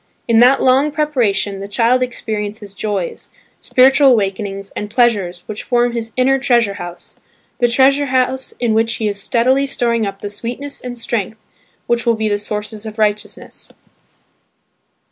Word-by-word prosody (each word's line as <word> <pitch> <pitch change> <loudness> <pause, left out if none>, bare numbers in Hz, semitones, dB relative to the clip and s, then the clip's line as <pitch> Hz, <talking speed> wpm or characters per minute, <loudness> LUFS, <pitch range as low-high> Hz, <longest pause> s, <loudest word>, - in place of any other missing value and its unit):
In 230 -1 +4
that 255 +3 +5
long 265 +3 +4
preparation, 240 -10 0
the 200 - -6
child 235 +5 +2
experiences 215 -4 -4
joys, 200 -3 -4 0.3
spiritual 265 +2 +4
awakenings 195 -2 -2
and 210 - -5
pleasures 210 -7 +1
which 215 0 -6
form 240 0 +1
his 230 -1 -4
inner 270 +1 +3
treasure 235 -6 +2
house–the 175 +7 -6
treasure 275 +4 +3
house 260 0 0
in 235 -3 +1
which 225 +1 +1
he 220 - -2
is 200 -1 -2
steadily 260 +5 +2
storing 235 -4 0
up 195 0 -7
the 205 - -4
sweetness 245 +7 -4
and 245 -1 -6
strength 220 -2 -1 0.5
which 235 0 -1
will 230 - +4
be 220 0 -1
the 205 -1 0
sources 210 +1 -5
of 215 +1 -8
righteousness. 210 -1 -3
230 Hz, 150 wpm, -17 LUFS, 205-255 Hz, 0.5 s, that